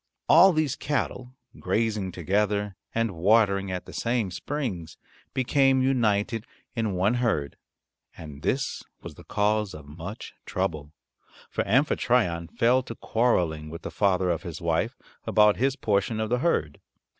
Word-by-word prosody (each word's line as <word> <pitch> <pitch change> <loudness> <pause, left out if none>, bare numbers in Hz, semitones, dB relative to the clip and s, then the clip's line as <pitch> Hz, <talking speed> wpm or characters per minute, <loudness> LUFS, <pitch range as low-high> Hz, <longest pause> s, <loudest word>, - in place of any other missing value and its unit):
All 180 +4 +8
these 155 -5 0
cattle 130 -3 -3 0.2
grazing 110 -4 -1
together 100 +3 0 0.2
and 115 -1 +1
watering 100 +2 +3
at 90 -1 -4
the - - -11
same 115 -5 -1
springs 95 - -4 0.4
became 135 0 +3
united 115 -3 +1 0.3
in 110 -3 -1
one 95 +5 +2
herd. 115 - 0 0.6
And 75 -3 -10
this 135 - -1 0.2
was - - -8
the - - -14
cause 105 0 0
of 75 -2 -10
much 85 +8 -8
trouble, 80 -6 -2 0.6
for - - 0
Amphitryon 115 - +2
fell 120 +8 +2
to 115 -2 -8
quarreling 85 -12 0
with 85 +1 -8
the - - -5
father 95 -3 +2
of 85 - -2
his 85 -4 -7
wife 80 -4 -1 0.3
about 105 -1 +4
his 135 +2 +1
portion 105 -2 0
of 110 +1 -2
the 125 - +2
herd. 80 - 0
105 Hz, 145 wpm, -26 LUFS, 90-125 Hz, 0.6 s, All